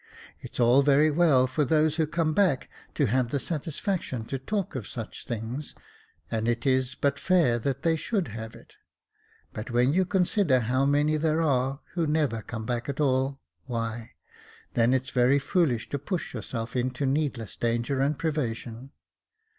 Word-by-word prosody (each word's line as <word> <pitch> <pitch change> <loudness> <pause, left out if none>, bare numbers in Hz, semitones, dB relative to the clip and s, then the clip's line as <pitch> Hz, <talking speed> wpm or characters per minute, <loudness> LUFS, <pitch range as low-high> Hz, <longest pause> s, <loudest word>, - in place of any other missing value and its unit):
It's - - -9
all 120 +3 +6
very 145 +2 +4
well 150 -5 +4
for 130 +4 0
those 155 +2 +2
who 160 -2 +2
come 155 0 0
back 180 -8 +2 0.3
to 145 - +2
have 125 +1 +1
the 140 - -1
satisfaction 155 - -3
to 135 +3 -4
talk 195 +7 -3
of 125 -7 -5
such 115 -3 -7
things, 120 +5 -5 0.6
and 110 0 -1
it 120 0 0
is 130 -1 +1
but 140 0 0
fair 160 -9 +3
that 135 +3 -2
they 165 -1 +3
should 185 +3 -2
have 110 +1 -7
it; - - -17 0.8
but 110 +3 -6
when 125 +3 +3
you 185 +2 +3
consider 180 -7 +2
how 130 +4 +1
many 145 +2 +2
there 160 +1 +1
are 135 -1 0
who 170 -2 0
never 150 -7 +1
come 115 0 -6
back 120 +2 -2
at 140 - -4
all, 135 -1 +1 0.3
why, 115 -1 -4 0.6
then 115 +1 +3
it's 130 0 0
very 125 +2 +4
foolish 140 - +1
to 140 - -2
push 170 +5 -4
yourself 115 0 -5
into 125 +2 -1
needless 135 -6 -1
danger 120 +3 -1
and 140 +1 +1
privation. 130 -5 -3
135 Hz, 170 wpm, -27 LUFS, 120-155 Hz, 0.8 s, all